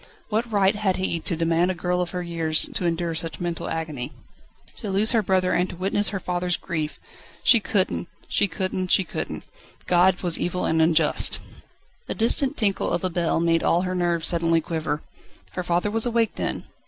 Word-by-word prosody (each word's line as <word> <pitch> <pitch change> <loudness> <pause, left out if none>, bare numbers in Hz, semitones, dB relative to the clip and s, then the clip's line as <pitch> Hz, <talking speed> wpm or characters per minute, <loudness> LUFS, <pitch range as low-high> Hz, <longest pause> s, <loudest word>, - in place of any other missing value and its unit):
What 225 +2 -1
right 200 -1 +3
had 205 -3 0
He 185 -3 -1
to 170 - +1
demand 165 +2 +1
a 185 - -1
girl 180 +1 -1
of 175 - -2
her 180 -1 -4
years 165 -2 +1
to 180 - -1
endure 170 0 -1
so 160 +1 -4
much 165 - -7
mental 175 -1 -3
agony? 155 -6 -4 0.7
To 210 - -5
lose 200 +3 +3
her 230 -3 +3
brother, 185 -2 +1
and 180 +1 +1
to - - -7
witness 195 +3 +1
her 195 - -3
father's 180 -1 -1
grief! 155 -4 -4 0.4
She 235 - +6
couldn't! 200 -5 -1 0.2
she 205 - +2
couldn't! 185 +1 -2
she 190 - +4
couldn't! 170 - -5 0.4
God 180 +1 +3
was 175 -2 +1
evil 180 +1 -1
and 160 0 +2
unjust! 160 -1 +4 0.7
A - - -2
distant 260 +5 +1
tinkle 200 -4 +2
of - - -1
a 185 - 0
bell 170 -2 0
made 165 0 +2
all 175 +2 +2
her 185 0 -2
nerves 175 -2 0
suddenly 165 -1 +3
quiver. 155 -2 -3 0.5
Her 180 - -3
father 175 +3 0
was 225 +2 +1
awake 230 -2 +1
then? - - -3
180 Hz, 195 wpm, -24 LUFS, 165-195 Hz, 0.7 s, She